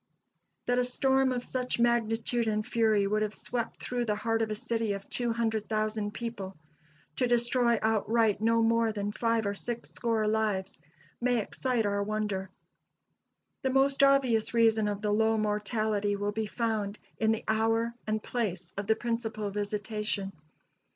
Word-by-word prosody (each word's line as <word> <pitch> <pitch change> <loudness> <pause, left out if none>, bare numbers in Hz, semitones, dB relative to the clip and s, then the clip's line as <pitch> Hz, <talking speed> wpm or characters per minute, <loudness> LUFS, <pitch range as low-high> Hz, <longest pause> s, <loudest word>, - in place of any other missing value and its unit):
That 245 0 +2
a - - +3
storm 265 +1 +2
of 245 -1 -2
such 250 -2 -2
magnitude 235 0 +1
and 215 0 0
fury 220 -4 +2
should 210 +2 +1
have 215 -1 -1
swept 235 -2 -3
through 245 -1 -1
the 210 -2 0
heart 225 +1 0
of 220 - 0
a 215 - -2
city 225 -1 -1
of 200 0 -7
200,000 220 -3 -1
people, 205 -6 -6 0.6
to 250 - +2
destroy 240 0 +3
outright 220 -1 +2
no 230 +1 +3
more 230 0 +3
than 205 -1 -3
five 230 0 0
or 200 - 0
six 235 +3 -5
score 225 -2 0
lives, 210 -3 -1 0.4
may 245 0 +2
excite 235 +2 -1
our 200 0 0
wonder. 205 -2 -2 1.1
The 265 - 0
most 270 +1 +3
obvious 260 -5 +4
reason 225 -2 +4
of 205 0 -3
the 210 - +1
low 220 +1 +3
mortality 210 -1 0
will 205 +1 -1
be 220 +1 -2
found 215 -3 -2 0.2
in 220 0 +3
the 220 - -1
hour 225 +1 +1
and 215 0 -1
place 185 -7 -3
of 200 - -4
the 220 - +4
principal 225 -3 -3
visitation. 205 -1 -2
220 Hz, 155 wpm, -29 LUFS, 210-235 Hz, 1.1 s, obvious